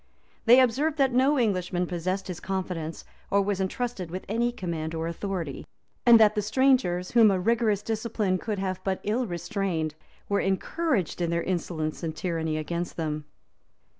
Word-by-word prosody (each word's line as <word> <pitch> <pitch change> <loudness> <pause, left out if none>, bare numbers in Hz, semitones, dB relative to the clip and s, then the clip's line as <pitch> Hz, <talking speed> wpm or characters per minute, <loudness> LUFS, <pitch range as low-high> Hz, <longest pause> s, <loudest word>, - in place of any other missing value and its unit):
They 245 +2 +8
observed 280 +5 +2
that 270 -3 +3
no 270 +4 +4
Englishman 180 -6 0
possessed 185 +3 -2
his 180 -2 -5
confidence, 180 -4 -4 0.2
or 200 - +3
was 195 -1 -1
intrusted 190 -2 -3
with 185 +3 -6
any 235 +3 +1
command 165 -7 -4
or 160 0 -2
authority; 170 -4 -4 0.4
and 235 -1 +9
that 215 -1 +6
the 210 - 0
strangers, 215 -6 +2
whom 230 -3 +6
a 190 -2 +1
rigorous 215 0 +1
discipline 215 -4 -1
could 210 +1 -3
have 190 -1 -3
but 190 -1 -1
ill 230 +4 0
restrained, 175 -4 -2 0.3
were 200 - +1
encouraged 195 - -1
in 170 - +1
their 170 0 0
insolence 165 -4 -2
and 160 -2 -3
tyranny 160 -3 -2
against 170 +2 -3
them. 155 -2 -3
190 Hz, 165 wpm, -27 LUFS, 170-225 Hz, 0.4 s, and